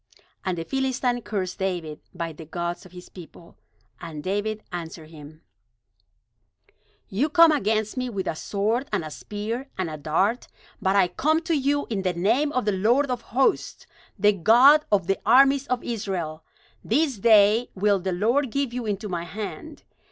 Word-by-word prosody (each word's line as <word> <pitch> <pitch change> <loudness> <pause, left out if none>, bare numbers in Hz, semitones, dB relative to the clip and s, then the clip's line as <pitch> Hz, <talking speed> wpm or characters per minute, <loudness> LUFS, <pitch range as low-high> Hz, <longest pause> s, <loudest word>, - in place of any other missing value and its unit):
And 185 -2 -2
the 165 - -4
Philistine 255 0 -1
cursed 200 -4 -4
David 175 -5 -3
by 170 -2 -5
the 160 - -11
gods 175 +2 -5
of - - -22
his 180 0 -12
people. 170 -1 -14 0.4
And 155 -2 -8
David 210 +3 -2
answered 165 -2 -7
him: 155 0 -13 1.6
"You 250 +11 0
come 330 +1 +6
against 215 -4 0
me 255 0 -2
with 200 -5 -4
a - - -2
sword, 215 - -2
and 195 -6 -1
a 155 - -7
spear, 225 - -5
and 185 -4 -2
a 155 - -6
dart; 190 - 0 0.3
but 190 +1 +1
I 195 -2 +4
come 310 - +1
to 335 0 -2
you 285 +1 0
in 205 -3 -1
the 185 -1 -1
name 230 - +1
of 255 -6 -1
the 210 - +2
Lord 240 +8 +2
of 250 - -2
hosts, 260 +4 0 0.3
the 210 0 +4
God 250 - +6
of 195 -4 +2
the 195 +2 0
armies 270 +4 +5
of 250 -1 -1
Israel. 185 -9 -4 0.4
This 270 -1 0
day 215 +2 +5
will 200 0 +2
the 190 +1 -3
Lord 235 +9 +1
give 275 0 -2
you 245 -2 -4
into 210 +1 -3
my 175 -3 -4
hand. 290 - -7
210 Hz, 175 wpm, -24 LUFS, 180-250 Hz, 1.6 s, come